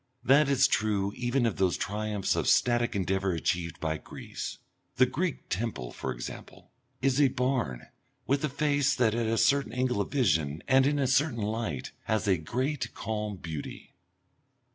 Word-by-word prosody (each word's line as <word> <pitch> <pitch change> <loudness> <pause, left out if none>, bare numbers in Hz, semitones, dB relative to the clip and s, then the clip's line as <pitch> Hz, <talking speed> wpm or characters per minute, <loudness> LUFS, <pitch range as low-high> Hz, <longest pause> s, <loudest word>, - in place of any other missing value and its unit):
That 140 +2 +5
is 140 0 +5
true 100 -5 0
even 120 +1 0
of 115 - 0
those 95 -2 +2
triumphs 105 0 -1
of - - -1
static 120 -2 +3
endeavour 95 0 0
achieved 85 +1 -2
by 80 -1 -2
Greece. - - -7 0.4
The 130 -1 +5
Greek 160 +6 -3
temple, 90 - -3
for - - -4
example, - - -9 0.3
is 135 +1 +3
a 140 - +6
barn 125 - -1 0.4
with 140 +3 +1
a 150 - +1
face 145 0 +1
that 115 -4 +2
at 115 -1 0
a 115 +1 +1
certain 140 +2 +2
angle 125 -4 0
of - - -3
vision 80 - +1
and 130 0 +5
in 145 0 +1
a 140 - +1
certain 130 -3 +2
light 105 - -3
has 110 -1 0
a 95 -2 +4
great 130 - -3
calm 105 -2 -3
beauty. 80 -4 -7
115 Hz, 165 wpm, -29 LUFS, 95-135 Hz, 0.4 s, a